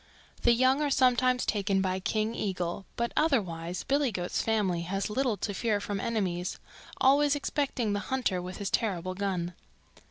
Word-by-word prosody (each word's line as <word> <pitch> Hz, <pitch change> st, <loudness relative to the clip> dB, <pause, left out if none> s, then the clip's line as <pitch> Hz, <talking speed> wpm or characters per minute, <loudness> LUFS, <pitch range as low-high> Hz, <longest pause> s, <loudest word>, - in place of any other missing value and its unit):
The 240 Hz, -, +5 dB
young 260 Hz, +4 st, +3 dB
are 295 Hz, -, +1 dB
sometimes 255 Hz, -1 st, +3 dB
taken 200 Hz, -2 st, +1 dB
by 190 Hz, 0 st, 0 dB
King 215 Hz, +3 st, -1 dB
Eagle, 185 Hz, -3 st, -3 dB
but 235 Hz, 0 st, -1 dB
otherwise 180 Hz, -, 0 dB
Billy 280 Hz, -2 st, +1 dB
Goat's 180 Hz, -3 st, -2 dB
family 205 Hz, -6 st, +1 dB
has 195 Hz, +4 st, -2 dB
little 245 Hz, -2 st, +1 dB
to 205 Hz, -, -3 dB
fear 210 Hz, +1 st, 0 dB
from 205 Hz, 0 st, -3 dB
enemies, 185 Hz, -5 st, -1 dB, 0.4 s
always 285 Hz, +2 st, +4 dB
excepting 275 Hz, -6 st, -1 dB
the 205 Hz, -, 0 dB
hunter 230 Hz, -6 st, -1 dB
with 180 Hz, +1 st, -7 dB
his 200 Hz, -2 st, -3 dB
terrible 185 Hz, -4 st, 0 dB
gun. 185 Hz, -3 st, -2 dB
210 Hz, 160 wpm, -29 LUFS, 185-255 Hz, 0.4 s, The